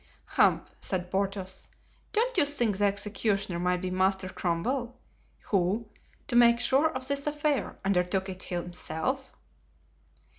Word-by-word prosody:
"Humph!" - - +2
said 180 -1 -2
Porthos. 195 -1 -2 0.4
"Don't 480 +3 +1
you 355 - +5
think 245 -8 +1
the 205 - +4
executioner 200 -2 0
might 180 0 +1
be 185 -1 -3
Master 190 0 +1
Cromwell, 235 +10 -2 0.5
who, 200 +3 +1 0.4
to 240 - -2
make 235 0 +6
sure 275 +6 +3
of 260 -3 -4
this 280 +1 -1
affair, 295 -5 0
undertook 190 0 +1
it 185 -1 -7
himself?" 175 - -3
200 Hz, 125 wpm, -29 LUFS, 185-260 Hz, 0.5 s, make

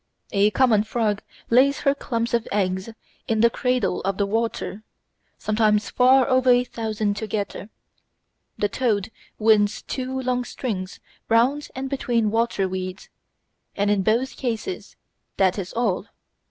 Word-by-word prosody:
A 200 +1 +4
common 220 -2 +3
frog 215 -2 -1 0.3
lays 270 +4 +4
her 275 - +3
clumps 235 -4 -3
of 235 -1 +1
eggs 190 0 -1 0.4
in 220 -1 +1
the 235 0 +5
cradle 250 -7 0
of 195 -1 -2
the 200 - +1
water, 225 -1 -2 0.6
sometimes 215 -1 +1
far 255 0 +5
over 255 0 +3
a 245 0 +5
thousand 220 -4 -2
together; 210 -1 -4 0.9
the 205 - +1
toad 215 -3 -1 0.3
winds 215 -1 +3
two 260 0 -4
long 250 -1 0
strings 200 -7 -5 0.3
round 250 +6 +3
and 265 +1 -3
between 240 -5 0
water 225 -4 +1
weeds; 185 0 -5 0.7
and 205 +1 +1
in 205 -2 +2
both 230 +6 0
cases 245 - -4 0.4
that 190 0 +2
is 185 -1 -5
all. 220 -4 -1
225 Hz, 140 wpm, -23 LUFS, 205-250 Hz, 0.9 s, the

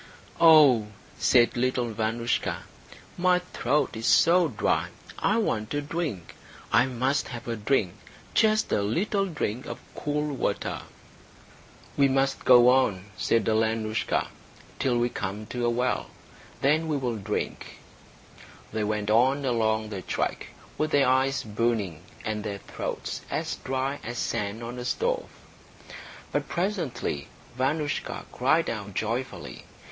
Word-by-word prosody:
"Oh," 150 -9 +7 0.3
said 120 -2 +4
little 125 -1 0
Vanoushka, 115 +2 -1 0.6
"my 180 0 +4
throat 150 -6 -1
is 110 +1 -3
so 175 +1 +5
dry. 110 -8 0 0.3
I 210 - +2
want 115 - -1
a 145 - 0
drink. 145 - -4 0.4
I 130 - +5
must 130 +3 0
have 120 -1 -8
a 115 - -1
drink 105 -4 +1 0.4
just 215 -1 +3
a - - +2
little 195 - 0
drink 130 - -3
of - - -5 0.2
cool 150 0 -2
water." - - -2 1.2
"We 140 - +5
must 135 0 0
go 125 -1 +8
on," 105 -7 +2
said 115 - +1
Alenoushka, 110 0 0 0.5
"till 130 -3 +1
we 120 0 +2
come 105 0 -4
to 120 -1 -1
a - - +3
well. 125 +1 0 0.5
Then 155 +4 +3
we 150 -2 0
will 125 -4 -2
drink." 100 - -4 1.0
They 110 -1 -1
went 105 0 -1
on 130 +5 +3
along 110 -3 +1
the 100 -3 -5
track, - - -2 0.3
with 155 - +1
their 140 -2 +3
eyes 130 +1 +2
burning 105 -6 -1 0.2
and 110 -1 -2
their 100 -2 -4
throats - - -5
as - - -2
dry 135 +2 -2
as 120 +2 -5
sand 105 +1 -2
on 120 +2 -6
a 125 - -5
stove. - - -1 1.0
But - - -2
presently 170 - -2 0.3
Vanoushka 145 +3 -1
cried 155 +6 +2
out 105 -3 -5
joyfully. 115 - -3
125 Hz, 135 wpm, -27 LUFS, 110-145 Hz, 1.2 s, go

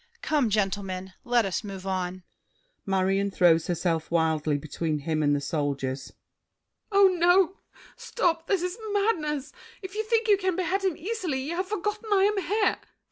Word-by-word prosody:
Come, 290 -7 +2
gentlemen! 195 -2 -2
Let 240 -2 +2
us 190 +2 -2
move 195 -2 -7
on! 185 -1 -3 0.6
MARION 195 +1 +1
(throws 175 -4 +3
herself 170 -2 -1
wildly 160 -3 +1
between 155 +2 -3
him 155 +1 -1
and 145 -1 +3
the - - 0
Soldiers). 140 -2 -3 0.8
Oh, 400 -1 +7
no! 360 +2 +4 0.4
Stop! 360 -9 -1
This 385 -4 +1
is 365 +5 -3
madness! 310 -10 0 0.3
If 380 0 -7
you 435 +1 -1
think 455 0 +1
you 410 -2 +5
can 375 -2 -1
behead 375 +2 -1
him 375 -5 0
easily, 360 -8 -3
You 320 +5 -3
have 370 +1 -2
forgotten 420 +2 -3
I 390 -1 +4
am 415 +1 +2
here. 415 +6 +1
265 Hz, 160 wpm, -27 LUFS, -, 0.8 s, Oh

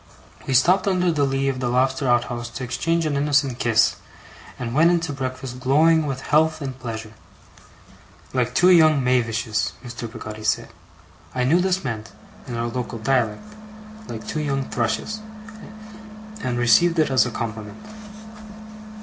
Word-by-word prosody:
We 130 - +1
stopped 185 +10 +4
under 180 -2 +2
the 145 -3 +1
lee 135 0 0
of 135 -1 -1
the 125 -1 -1
lobster 130 +2 +1
outhouse 120 -1 0
to 130 +2 -7
exchange 165 +7 -1
an 150 -2 -1
innocent 140 -3 +1
kiss, 115 -2 +3 0.6
and 120 -1 -5
went 160 +5 +5
in 175 -1 +3
to 165 -3 -3
breakfast 130 -1 -5
glowing 155 +4 +3
with 135 -2 -4
health 155 +2 +2
and 135 -3 -5
pleasure. 110 -3 -6 1.2
'Like 125 -2 -1
two 180 +1 +5
young 155 -5 +5
mavishes,' 115 -5 0
Mr. 120 -1 -7
Peggotty 110 -2 -8
said. 110 - 0 0.7
I 125 - +1
knew 155 +8 +3
this 190 0 0
meant, 110 -5 -5 0.3
in 120 -2 -4
our 115 - -1
local 120 0 -4
dialect, 115 - 0 0.6
like 110 -2 -7
two 155 - -2
young 135 -2 -2
thrushes, 125 - -2 1.2
and 125 -7 -2
received 120 +9 +4
it 155 -3 +2
as 130 -4 +4
a - - -3
compliment. 110 -2 -6
130 Hz, 155 wpm, -22 LUFS, 120-150 Hz, 1.2 s, went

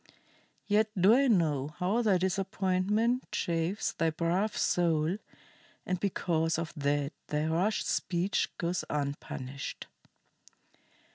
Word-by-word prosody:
Yet 215 +1 +3
do 195 +5 +6
I 275 +3 +4
know 155 - +1
how 195 +6 +1
thy 205 -5 +3
disappointment 195 +5 0
chafes 170 +4 -1
thy 165 - 0
brave 175 +6 0
soul, 170 +1 +1 0.7
and 185 -1 -1
because 165 -4 0
of 165 -1 -4
that 145 -1 0
thy 150 +1 -1
rash 175 +7 +1
speech 175 +2 0
goes 175 +1 -1
unpunished." 140 -2 -4
175 Hz, 110 wpm, -30 LUFS, 160-200 Hz, 0.7 s, do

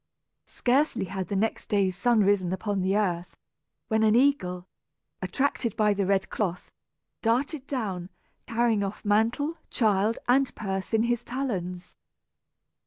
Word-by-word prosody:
Scarcely 265 -3 +1
had 190 -1 -4
the 200 - -3
next 215 +3 -1
day's 195 -3 +2
sun 240 +1 +3
risen 195 -3 +2
upon 195 +1 -1
the 190 +2 +1
earth, 180 -4 -1 0.5
when 220 -1 +1
an 220 0 +4
eagle, 185 -10 +2 0.6
attracted 265 -5 -1
by 210 -1 +3
the 200 -1 -1
red 195 -1 +2
cloth, 185 -4 -3 0.5
darted 265 +5 0
down, 195 -9 -3 0.4
carrying 230 -2 +2
off 200 +2 -5
mantle, 230 +10 +1
child, 215 -1 +2
and 260 +1 +3
purse 195 -2 -4
in 225 0 +3
his 240 0 0
talons. 185 -9 -4
210 Hz, 135 wpm, -27 LUFS, 190-240 Hz, 0.6 s, an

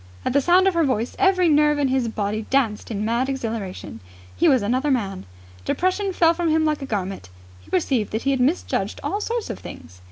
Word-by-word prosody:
At - - 0
the 280 - +4
sound 360 +6 +4
of 385 - +3
her 335 -1 +2
voice 250 -4 -1
every 375 -2 +4
nerve 300 -1 +4
in 285 -2 +1
his 260 -2 +1
body 215 0 -3
danced 235 -6 0
in 210 -2 -3
mad 235 +4 0
exhilaration. 225 - -5 0.4
He - - +3
was 260 -6 +3
another 255 +7 0
man. 195 - -2 0.4
Depression 370 - 0
fell 335 -2 +3
from 340 -1 -1
him 315 0 +2
like 305 -1 0
a 275 - -5
garment. 195 - -4 0.3
He 90 - -20
perceived 210 +4 0
that 220 - -3
he 275 - +1
had 265 - 0
misjudged 280 +8 0
all 410 - -2
sorts 465 +1 -3
of - - -7
things. 90 +3 -11
265 Hz, 215 wpm, -22 LUFS, 215-320 Hz, 0.4 s, the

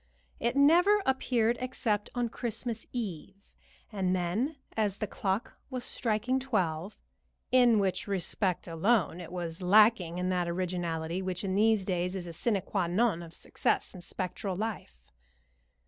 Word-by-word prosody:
It 235 +2 0
never 350 +9 +5
appeared 245 -3 +2
except 235 -5 -1
on 240 -1 0
Christmas 235 0 -4
Eve, 195 -6 -5 0.6
and 190 -3 0
then 195 - -1 0.2
as 210 -3 0
the - - -2
clock 195 +2 -3
was 255 -2 -4
striking 245 +3 0
twelve, 190 -8 -1 0.5
in 245 -3 +6
which 195 -1 0
respect 190 -1 -1
alone 175 0 +1
was 175 0 -5
it - - -5
lacking 200 -3 +5
in 180 0 -1
that 180 -1 0
originality 170 -1 -2
which 185 0 -3
in 190 -1 -1
these 215 0 +3
days 180 0 -1
is 185 -2 -4
a 170 - -7
sine 205 +5 +1
qua 190 -4 -1
non 185 0 +2
of 165 -1 -10
success - - -1
in 185 - -9
spectral 185 +2 -3
life. 185 - -5
195 Hz, 145 wpm, -30 LUFS, 180-235 Hz, 0.6 s, in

